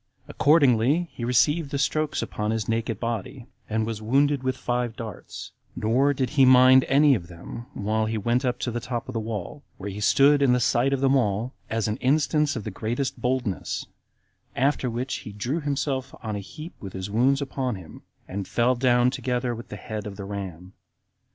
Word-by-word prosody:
Accordingly, 145 +2 +3
he 120 - -7
received 145 +6 +2
the 140 - -2
strokes 155 +2 0
upon 105 0 -3
his 110 -2 -1
naked 115 -1 -1
body, 120 +2 -4 0.2
and 110 0 0
was 110 -1 -4
wounded 140 +5 +2
with 130 0 -1
five 120 -2 -2
darts; 110 -1 -8 0.2
nor 125 +6 +2
did 130 -3 -1
he 140 -2 +4
mind 130 0 +7
any 145 +1 +5
of 90 -9 -2
them 90 +7 -9
while 110 +2 0
he 110 0 -2
went 120 +5 +1
up 125 -1 0
to 120 - -1
the 120 - -2
top 120 0 -4
of 130 - -6
the 115 - -1
wall, 110 +5 -5 0.2
where 100 +1 -5
he 100 - -7
stood 140 +7 +4
in 135 -3 +4
the 125 - +3
sight 120 +2 +2
of 135 -1 0
them 135 0 +4
all, 115 0 0 0.2
as 110 0 -1
an 105 +1 -2
instance 150 +2 +2
of 115 - -4
the 110 - -5
greatest 120 +7 -3
boldness; 125 -6 -2 0.7
after 135 0 +1
which 125 +3 -3
he 105 - -9
drew 120 +10 -2
himself 135 -2 -2
on 110 -2 -3
a - - -3
heap 155 - -9
with 95 -2 -8
his 95 +1 -5
wounds 130 +5 +3
upon 135 -3 -2
him, 90 -4 -11 0.3
and 100 0 -5
fell 120 +2 +2
down 125 0 +3
together 125 -1 -1
with 115 +1 -8
the - - -6
head 105 -2 -6
of 100 - -7
the 100 -1 -7
ram. 95 -2 -7
120 Hz, 200 wpm, -25 LUFS, 110-135 Hz, 0.7 s, mind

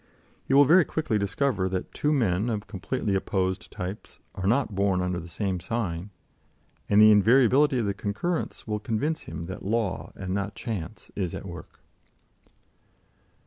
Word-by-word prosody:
He 135 - +1
will 145 +1 +8
very 175 +5 +6
quickly 145 -9 -1
discover 100 -1 0
that 95 -1 -4
two 150 - 0
men 110 -6 +1
of 105 -2 -2
completely 105 +2 -3
opposed 95 0 -1
types 90 +3 -7 0.2
are 95 - -3
not 120 0 +2
born 95 -1 +1
under 90 -1 -1
the 85 - -9
same 95 +1 -2
sign, 95 -3 -3 0.8
and 105 - +5
the 110 0 +9
invariability 130 +6 +5
of 115 - 0
the 100 - 0
concurrence 105 - -3
will 105 -1 -2
convince 120 +9 -2
him - - -6
that 95 +3 -7
law, 105 -2 -1
and 95 -1 -4
not 100 +1 -2
chance, 110 -3 -6
is 90 -4 -2
at - - -7
work. 85 -4 -10
105 Hz, 160 wpm, -26 LUFS, 95-120 Hz, 0.8 s, the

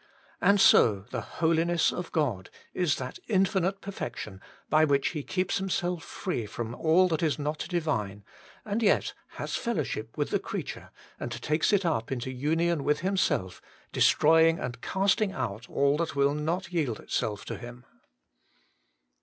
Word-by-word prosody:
And 200 0 +5
so 105 - +6
the - - -2
Holiness 165 +1 +1
of 180 -1 -5
God 120 - -1 0.2
is 175 -5 +1
that 130 0 -6
infinite 195 -2 +1
Perfection 120 - -6 0.3
by 155 0 +4
which 145 -2 +2
He 155 -1 -4
keeps 185 +6 -1
Himself 180 -3 -1
free 125 - -4
from 115 +2 -5
all 165 +7 +4
that 160 -2 0
is 160 -3 +1
not 150 +1 -3
Divine, 110 - -2 0.4
and 210 +2 -1
yet 210 - +2 0.2
has - - -4
fellowship 115 - -3
with - - -1
the - - +2
creature, - - -6 0.3
and 120 - -4
takes 150 - 0
it 200 -3 +2
up 140 -9 -1
into 130 0 -3
union 160 +4 0
with 150 +1 +1
Himself, 185 - 0 0.3
destroying 165 0 +5
and 125 -3 -5
casting 195 +1 +1
out 105 +5 -4
all 140 +1 +2
that 160 -3 -2
will 140 0 +3
not 170 +4 -2
yield 140 -10 0
itself 105 -2 -3
to - - -4
Him. 120 0 -10
155 Hz, 155 wpm, -28 LUFS, 125-180 Hz, 0.4 s, so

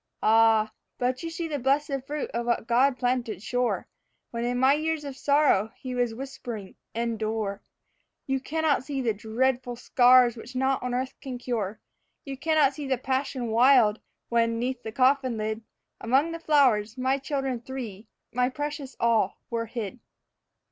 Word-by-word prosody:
Ah, 225 0 +5
you 215 - -13 0.3
but 250 +1 0
see 330 0 -4
the 295 -3 -3
blessed 275 +1 0
fruit 295 0 -3
of 235 0 -3
what 235 -2 0
God 255 +3 +3
planted 245 -5 -1
sure, 245 +1 -1 0.4
When 235 0 -3
in 245 0 0
my 260 +2 +5
years 315 +1 -1
of 280 -2 -6
sorrow 280 -8 +3
He 255 -1 -6
was 245 -2 0
whispering, 240 -6 -7 0.2
'Endure.' 220 -3 -2 0.6
You 270 0 0
cannot 310 0 0
see 280 -1 -4
the 225 -2 +1
dreadful 245 +4 -1
scars 245 0 +5
which 240 +2 -10
naught 265 +1 +1
on 250 0 -2
earth 260 +1 -2
can 260 -2 -5
cure. 220 -4 -3 0.5
You 275 -1 -5
cannot 300 -1 +3
see 290 -2 -6
the 260 -1 +1
passion 260 -1 -2
wild, 235 -2 +5 0.3
when, 230 -1 +2
'neath 250 +1 -2
the 220 - -6
coffin 255 0 +2
lid, 220 +1 -2 0.4
Among 270 +8 +2
the 330 - -5
flowers, 255 -8 +3
my 260 +2 +1
children 270 -3 -2
three, 235 -5 -7 0.3
my 250 +1 +2
precious 290 0 -5
all, 225 -4 +2
were 230 -1 -2
hid. 230 0 -5
250 Hz, 160 wpm, -27 LUFS, 230-270 Hz, 0.6 s, Ah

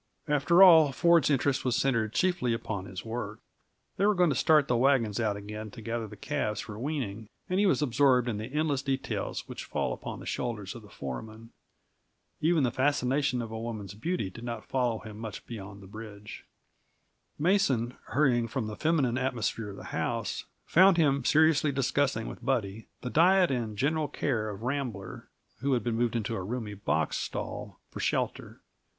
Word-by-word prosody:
After 150 +5 +5
all, 160 -6 +8
Ford's 170 +4 +4
interest 140 -1 +1
was 125 -2 +1
centered 115 -5 +1
chiefly 175 -7 +1
upon 105 -4 -4
his 95 +2 -8
work. 110 -2 -5 0.6
They 195 - +2
were 210 - +3
going 180 -3 +4
to - - 0
start 150 +1 +4
the 125 - +2
wagons 120 -4 +2
out 105 -3 0
again 105 +1 -7
to 115 - -11
gather 115 0 -3
the - - -11
calves 105 -1 -2
for 105 -1 -8
weaning, 120 -7 -3 0.2
and 185 +1 0
he 205 - +4
was 170 - +2
absorbed 125 -1 +3
in 110 -4 -1
the 110 +4 -6
endless 150 -2 0
details 135 -1 -3
which - - -7
fall - - -1
upon - - -7
the - - -10
shoulders 105 -6 -3
of 120 - -10
the 105 - -15
foreman. 110 - -7 0.9
Even 160 -1 +3
the 125 - +2
fascination 135 -1 +1
of 115 - -7
a 110 - -4
woman's 110 -5 -5
beauty 110 - -2
did 115 - -10
not 115 -2 -5
follow 125 -4 0
him 110 -1 -10
much 110 -3 -7
beyond 100 -3 -8
the - - -12
bridge. 105 0 -10 0.9
Mason, 145 - +2
hurrying 120 -3 +2
from 120 0 -3
the 105 0 -5
feminine 140 -5 +1
atmosphere 120 -4 -2
at 100 - -8
the - - -10
house, - - -2 0.2
found 185 +1 +6
him 140 -5 +3
seriously 155 +1 +4
discussing 135 -3 0
with - - -8
Buddy 110 -5 -1
the 125 - -4
diet 180 +1 +5
and 115 -5 -2
general 150 +5 +1
care 120 -6 -1
of 105 +1 -7
Rambler, 120 -8 -4 0.3
who 135 +3 +1
had 125 - +1
been 120 - -1
moved 120 0 0
into 115 0 -1
a 95 - -3
roomy 110 +2 -4
box 80 -6 -1
stall - - -5
for - - -7
shelter. - - -2
120 Hz, 185 wpm, -29 LUFS, 110-145 Hz, 0.9 s, all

